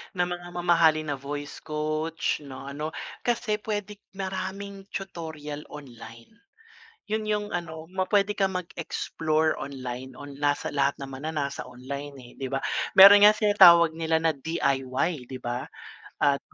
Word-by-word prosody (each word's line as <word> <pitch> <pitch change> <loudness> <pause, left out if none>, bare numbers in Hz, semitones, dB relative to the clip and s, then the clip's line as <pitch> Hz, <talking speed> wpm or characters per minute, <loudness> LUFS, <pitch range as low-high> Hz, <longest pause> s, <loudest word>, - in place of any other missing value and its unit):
ng 180 - +2
mga 175 0 -5
mamahalin 165 -3 +3
na 140 - -3
voice 145 +1 -6
coach, 155 +2 -2
'no, 135 -2 -10
ano. 150 +3 -5 0.2
Kasi, 225 -3 -1
puwede 210 -1 -4 0.2
maraming 195 +1 -5
tutorial 160 -6 -6
online, 115 - -12 0.8
'yon 215 -1 -1
yung 210 -1 0
ano, 160 -2 -4
ma 185 -1 -1
pwede 205 0 +3
kang 195 -2 0
mag-explore 160 -2 -1
online, 130 -1 -6
on 145 0 -9
nasa 145 -1 0
lahat 140 -1 +1
naman 135 +2 -6
na, 160 - -6
nasa 140 -2 -3
online, 140 +3 -7
eh, 120 - -14
'di 135 - -2
ba? 135 0 -2 0.4
Meron 200 +1 +11
nga, 215 - +4
tinatawag 170 -6 +7
nila 160 0 0
na 160 0 +2
DIY 140 -1 -1
'di 130 - -6
ba, 120 +1 -3 0.6
at 140 -1 +4
155 Hz, 145 wpm, -26 LUFS, 140-185 Hz, 0.8 s, Meron